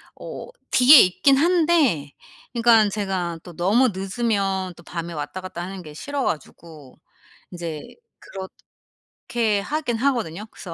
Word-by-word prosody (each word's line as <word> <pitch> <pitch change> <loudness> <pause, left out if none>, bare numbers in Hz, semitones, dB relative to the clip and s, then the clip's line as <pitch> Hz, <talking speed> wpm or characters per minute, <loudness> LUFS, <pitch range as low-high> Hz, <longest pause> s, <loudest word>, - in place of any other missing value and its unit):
어 - - -8 0.2
뒤에 260 +2 +8
있긴 270 +9 +3
한데 310 - +2 0.4
그니깐 230 -3 +4
제가 190 -5 -3
또 175 - -11
너무 210 +10 +3
늦으면 195 -2 -2
또 170 - -16
밤에 170 0 -6
왔다갔다하는 185 +3 -6
게 150 -2 -11
싫어 285 - -4
가지고 150 - -6 0.5
이제 170 -4 -6 0.4
그렇게 190 -1 -11 0.9
하긴 285 0 -2
하거든요. 225 - -1
그래서 175 - -9
190 Hz, 265 characters per minute, -22 LUFS, 170-245 Hz, 0.9 s, 뒤에